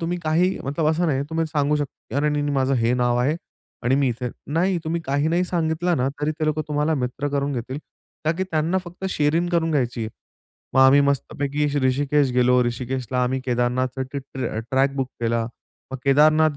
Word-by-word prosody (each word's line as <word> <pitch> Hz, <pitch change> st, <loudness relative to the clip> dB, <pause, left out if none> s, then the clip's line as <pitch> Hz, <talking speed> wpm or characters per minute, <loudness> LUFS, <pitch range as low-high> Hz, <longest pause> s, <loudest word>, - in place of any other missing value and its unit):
तुम्ही 170 Hz, +1 st, -2 dB
काही 175 Hz, +4 st, +2 dB
मतलब 145 Hz, +4 st, -1 dB
असं 170 Hz, +2 st, +1 dB
नाही 140 Hz, -4 st, +1 dB
तुम्ही 165 Hz, 0 st, 0 dB
सांगू 150 Hz, -1 st, +1 dB
शकता 145 Hz, -2 st, -5 dB
अरे! 150 Hz, +1 st, +2 dB
नाही-नाही 145 Hz, -1 st, 0 dB
माझं 135 Hz, 0 st, +2 dB
हे 115 Hz, -1 st, +2 dB
नाव 120 Hz, -1 st, +2 dB
आहे 140 Hz, +6 st, +1 dB, 0.5 s
आणि 125 Hz, +2 st, +2 dB
मी 140 Hz, -1 st, +2 dB
इथे 125 Hz, +1 st, -3 dB, 0.2 s
नाही 175 Hz, +3 st, +2 dB
तुम्ही 165 Hz, +1 st, -1 dB
काही 145 Hz, +3 st, +1 dB
नाही 175 Hz, +2 st, +2 dB
सांगितलं 170 Hz, 0 st, 0 dB
ना, 130 Hz, 0 st, +1 dB
तरी 150 Hz, +1 st, +1 dB
ते -, -, +2 dB
लोकं 155 Hz, 0 st, 0 dB
तुम्हाला 150 Hz, +1 st, +1 dB
मित्र 135 Hz, +1 st, -2 dB
करून 140 Hz, 0 st, -1 dB
घेतील. 130 Hz, +2 st, -4 dB, 0.5 s
का 155 Hz, -, +3 dB
की 185 Hz, +3 st, -2 dB
त्यांना 160 Hz, +4 st, +1 dB
फक्त 175 Hz, +2 st, -9 dB
शेअरिंग 160 Hz, +3 st, +1 dB
करून 165 Hz, -1 st, +2 dB
घ्यायची 125 Hz, -6 st, 0 dB
आहे. 110 Hz, -1 st, -3 dB, 0.6 s
मग 130 Hz, -, +5 dB
आम्ही 135 Hz, +2 st, +7 dB
मस्तपैकी 140 Hz, +1 st, 0 dB, 0.2 s
ऋषिकेश 140 Hz, +1 st, +2 dB
गेलो. 125 Hz, 0 st, +4 dB
ऋषिकेशला 125 Hz, +1 st, -2 dB
आम्ही 130 Hz, +1 st, -1 dB
केदारनाथ 125 Hz, +1 st, 0 dB
ट्र 135 Hz, -1 st, -4 dB, 0.2 s
ट्रॅक 135 Hz, +1 st, +2 dB
बुक 135 Hz, -2 st, -1 dB
केला. 115 Hz, 0 st, 0 dB, 0.4 s
मग 135 Hz, -, -3 dB
केदारनाथ 155 Hz, +2 st, +4 dB
140 Hz, 190 wpm, -23 LUFS, 130-155 Hz, 0.6 s, आम्ही